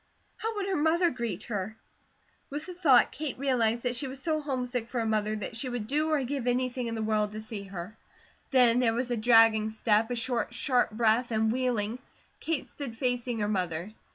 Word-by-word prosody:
How 450 Hz, 0 st, -3 dB
would 405 Hz, -2 st, -2 dB
her 385 Hz, -1 st, -1 dB
mother 335 Hz, +3 st, +3 dB
greet 230 Hz, -6 st, -4 dB
her? 215 Hz, -1 st, -4 dB, 0.7 s
With 295 Hz, +2 st, -5 dB
the 365 Hz, -, -7 dB
thought, 295 Hz, -9 st, +5 dB
Kate 300 Hz, -2 st, -5 dB
realized 240 Hz, -4 st, +1 dB
that 245 Hz, -1 st, 0 dB
she 275 Hz, +3 st, -3 dB
was 265 Hz, +1 st, -6 dB
so 310 Hz, +2 st, -1 dB
homesick 250 Hz, -4 st, -3 dB
for 255 Hz, -, -4 dB
her 225 Hz, -, 0 dB
mother 215 Hz, -1 st, 0 dB
that 215 Hz, +2 st, -5 dB
she 255 Hz, +3 st, -2 dB
would 245 Hz, -3 st, -3 dB
do 300 Hz, +6 st, 0 dB
or 305 Hz, -3 st, +1 dB
give 260 Hz, -1 st, -3 dB
anything 250 Hz, 0 st, 0 dB
in 230 Hz, -, -3 dB
the 220 Hz, -, -2 dB
world 210 Hz, -1 st, 0 dB
to 215 Hz, -, -5 dB
see 215 Hz, -2 st, -6 dB
her. 190 Hz, +2 st, -7 dB, 0.5 s
Then 250 Hz, -3 st, +6 dB
there 230 Hz, -3 st, +2 dB
was 245 Hz, +1 st, -2 dB
a -, -, +2 dB
dragging 225 Hz, -1 st, +5 dB
step, 220 Hz, 0 st, +1 dB
a 245 Hz, -, -1 dB
short, 240 Hz, 0 st, -2 dB
sharp 250 Hz, 0 st, +2 dB
breath, 225 Hz, +2 st, +2 dB
and 220 Hz, -1 st, +1 dB
wheeling, 240 Hz, -2 st, -1 dB, 0.4 s
Kate 325 Hz, -2 st, -1 dB
stood 255 Hz, -6 st, -7 dB
facing 245 Hz, -1 st, 0 dB
her 205 Hz, -, +1 dB
mother. 180 Hz, -1 st, -2 dB
240 Hz, 210 wpm, -29 LUFS, 220-260 Hz, 0.7 s, Then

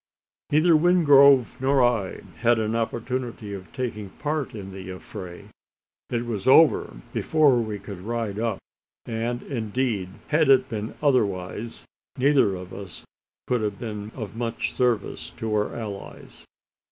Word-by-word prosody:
Neither 155 Hz, +3 st, +5 dB
Wingrove 145 Hz, -6 st, +6 dB
nor 135 Hz, 0 st, +3 dB
I 115 Hz, -6 st, 0 dB, 0.2 s
had 120 Hz, 0 st, +3 dB
an 110 Hz, 0 st, -1 dB
opportunity 115 Hz, -1 st, -3 dB
of 95 Hz, -2 st, -9 dB
taking 110 Hz, -6 st, -4 dB
part 145 Hz, +2 st, -3 dB
in 95 Hz, -2 st, -7 dB
the 95 Hz, -1 st, -8 dB
affray. 90 Hz, -1 st, -9 dB, 0.6 s
It 120 Hz, -1 st, -1 dB
was 110 Hz, -3 st, -4 dB
over 130 Hz, -, +5 dB
before 145 Hz, -6 st, +3 dB
we 110 Hz, -2 st, -3 dB
could 100 Hz, -1 st, -9 dB
ride 110 Hz, -1 st, -3 dB
up; 115 Hz, -3 st, -1 dB, 0.5 s
and, 120 Hz, +2 st, -3 dB
indeed, 115 Hz, -5 st, -2 dB, 0.2 s
had 155 Hz, -1 st, +3 dB
it 130 Hz, -1 st, +5 dB
been 110 Hz, 0 st, -4 dB
otherwise, 105 Hz, -5 st, 0 dB, 0.3 s
neither 135 Hz, -7 st, +3 dB
of 90 Hz, 0 st, -9 dB
us 95 Hz, -5 st, -9 dB, 0.4 s
could 125 Hz, -2 st, 0 dB
have 105 Hz, -2 st, -2 dB
been 105 Hz, -3 st, -6 dB
of 110 Hz, -4 st, -6 dB
much 115 Hz, 0 st, -2 dB
service 120 Hz, -4 st, 0 dB
to 110 Hz, -1 st, -3 dB
our 105 Hz, 0 st, 0 dB
allies. 105 Hz, -4 st, -8 dB
115 Hz, 140 wpm, -25 LUFS, 105-130 Hz, 0.6 s, Wingrove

